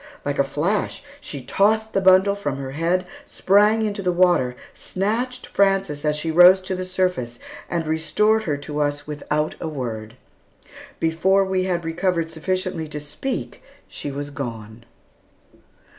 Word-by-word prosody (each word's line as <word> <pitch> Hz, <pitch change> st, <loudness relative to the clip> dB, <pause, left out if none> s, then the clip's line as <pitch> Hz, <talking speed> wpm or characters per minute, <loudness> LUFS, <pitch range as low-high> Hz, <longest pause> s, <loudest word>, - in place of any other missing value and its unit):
Like 145 Hz, 0 st, -2 dB
a -, -, +5 dB
flash, 170 Hz, -, -1 dB, 0.2 s
she 140 Hz, -, -7 dB
tossed 220 Hz, +9 st, +2 dB
the 195 Hz, -, +2 dB
bundle 190 Hz, +1 st, +5 dB
from 145 Hz, -9 st, -3 dB
her 135 Hz, -1 st, -5 dB
head, 170 Hz, +5 st, 0 dB, 0.2 s
sprang 210 Hz, +3 st, +3 dB
into 205 Hz, -1 st, -3 dB
the 180 Hz, -2 st, +1 dB
water, 175 Hz, -8 st, +3 dB, 0.2 s
snatched 235 Hz, +6 st, -2 dB
Frances 195 Hz, -7 st, +1 dB
as 150 Hz, -1 st, +1 dB
she 160 Hz, +2 st, -2 dB
rose 180 Hz, +3 st, +8 dB
to 185 Hz, 0 st, -4 dB
the 185 Hz, 0 st, -4 dB
surface, 180 Hz, -10 st, -1 dB, 0.3 s
and 170 Hz, -2 st, -1 dB
restored 210 Hz, +8 st, +1 dB
her 150 Hz, -4 st, -1 dB
to 145 Hz, +1 st, -5 dB
us 145 Hz, 0 st, -1 dB
without 150 Hz, +1 st, -2 dB
a -, -, -3 dB
word. 115 Hz, -6 st, -5 dB, 0.8 s
Before 190 Hz, +5 st, +2 dB
we 190 Hz, -1 st, 0 dB
had 175 Hz, -3 st, -1 dB
recovered 165 Hz, 0 st, -1 dB
sufficiently 180 Hz, 0 st, -2 dB
to 150 Hz, 0 st, -5 dB
speak, 150 Hz, -, -5 dB, 0.3 s
she -, -, -6 dB
was 145 Hz, +1 st, -5 dB
gone. 115 Hz, -4 st, -7 dB
170 Hz, 150 wpm, -22 LUFS, 145-195 Hz, 0.8 s, rose